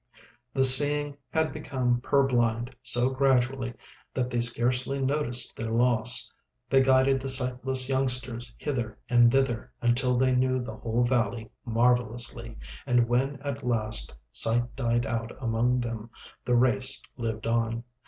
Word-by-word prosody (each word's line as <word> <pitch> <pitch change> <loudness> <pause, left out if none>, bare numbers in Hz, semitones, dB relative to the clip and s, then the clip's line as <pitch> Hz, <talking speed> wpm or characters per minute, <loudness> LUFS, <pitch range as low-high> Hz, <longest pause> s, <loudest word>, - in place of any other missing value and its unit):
The 135 - +2
seeing 145 +2 +7
had 160 +3 -1
become 130 -5 -2
purblind 125 -3 0
so 125 +1 +1
gradually 130 -2 0 0.4
that 125 -1 -2
they 120 - -1
scarcely 125 +3 +1
noticed 135 -3 +1
their 115 0 -6
loss. 120 +1 +1 0.4
They 135 -1 +4
guided 135 0 +2
the 135 +1 -5
sightless 130 0 0
youngsters 125 -3 -1
hither 120 -7 -5
and 120 -1 +4
thither 135 -3 -1
until 125 +1 +1
they 130 0 +1
knew 130 0 0
the 115 -3 -8
whole 115 +2 -2
valley 115 -3 -2
marvellously, 120 -1 -1 0.3
and 120 -2 +2
when 135 +4 -1
at 140 -1 -6
last 110 -3 +1 0.2
sight 120 +2 +1
died 120 -2 -1
out 115 0 -4
among 120 +1 -1
them 115 -1 -6 0.4
the 125 - +1
race 130 +2 +1
lived 115 -3 -5
on. 115 0 -2
125 Hz, 135 wpm, -26 LUFS, 120-130 Hz, 0.4 s, seeing